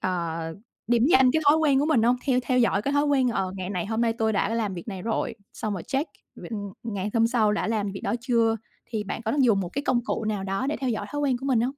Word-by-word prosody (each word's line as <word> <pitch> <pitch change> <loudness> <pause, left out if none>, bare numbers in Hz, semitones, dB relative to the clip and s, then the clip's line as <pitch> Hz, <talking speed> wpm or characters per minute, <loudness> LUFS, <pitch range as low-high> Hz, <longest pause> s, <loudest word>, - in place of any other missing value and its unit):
ờ, 170 -3 -2 0.5
điểm 240 +2 +3
danh 260 -5 +6
cái 315 +4 +1
thói 300 - +7
quen 290 -4 +3
của 290 - +2
mình 265 -8 +3
hông? 240 +2 +4
Theo 260 -3 +3
theo 255 0 +1
dõi 230 -4 +2
cái 280 - -1
thói 285 0 +3
quen, 270 -3 +3
ờ, 190 -5 -1
ngày 185 +1 -4
này 180 -2 -2
hôm 220 +2 -1
nay 230 -1 +2
tôi 225 -1 0
đã 195 -1 +1
làm 215 -4 -1
việc 175 +4 -8
này 190 -3 -5
rồi, 225 +2 -1 0.2
xong 215 - -3
rồi 185 -4 -4
check 275 +4 -2 0.3
v - - -11
ừm, 205 -3 -5
ngày 205 -3 -3
hôm 230 -1 +4
sau 225 -3 +2
đã 210 - -1
làm 210 -3 0
việc 195 - -6
đó - - -1
chưa, 230 -3 +2 0.3
thì 220 -3 -3
bạn 210 - -5
có 225 - -1
đang 280 0 +2
dùng 215 -5 +4
một 180 - -3
cái 280 +10 -3
công 240 - +2
cụ 225 - -2
nào 210 -3 -2
đó 195 +6 -2
để 295 - -1
theo 260 -2 -2
dõi 215 -3 -2
thói 290 - -3
quen 270 -3 +1
của 270 - -6
mình 260 -4 +3
hông? - - +2
225 Hz, 295 wpm, -26 LUFS, 205-260 Hz, 0.5 s, thói